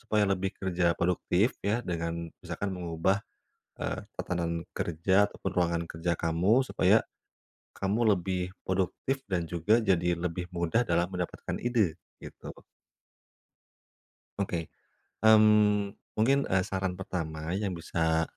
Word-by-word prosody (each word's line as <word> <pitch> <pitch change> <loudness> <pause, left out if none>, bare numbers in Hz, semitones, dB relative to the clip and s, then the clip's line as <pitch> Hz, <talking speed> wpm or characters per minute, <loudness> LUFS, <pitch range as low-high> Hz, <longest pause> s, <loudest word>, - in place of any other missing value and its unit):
supaya 105 -1 +1
lebih 95 0 -1
kerja 90 -2 +1
produktif 90 +5 +1
ya, 110 +4 +1
dengan 85 -1 -3
misalkan 90 +3 -4
mengubah, 90 +3 0 0.6
eee, - - -2 0.2
tatanan 85 -1 -2
kerja, 95 +5 +2
ataupun 95 - -4
ruangan 85 -1 +1
kerja 85 +1 -1
kamu, 90 +10 +3
supaya 100 +1 +4 0.7
kamu 105 +2 +2
lebih 90 0 -2 0.2
produktif 95 +8 -1
dan 90 -2 0
juga 90 +7 +3
jadi 90 -4 +2
lebih 90 +1 -3
mudah 85 +7 +1
dalam 85 +1 +2
mendapatkan 90 -1 -4
ide, 115 -9 +2 0.3
gitu. - - -9 1.9
Oke. 85 -5 -2 0.5
Mmm, 105 -2 +5 0.2
mungkin, 135 +6 +4
eee, 95 0 +2
saran 95 -1 -2
pertama 80 -4 -4
yang 100 -3 -2
bisa 80 -1 0
90 Hz, 120 wpm, -29 LUFS, 85-100 Hz, 1.9 s, Mmm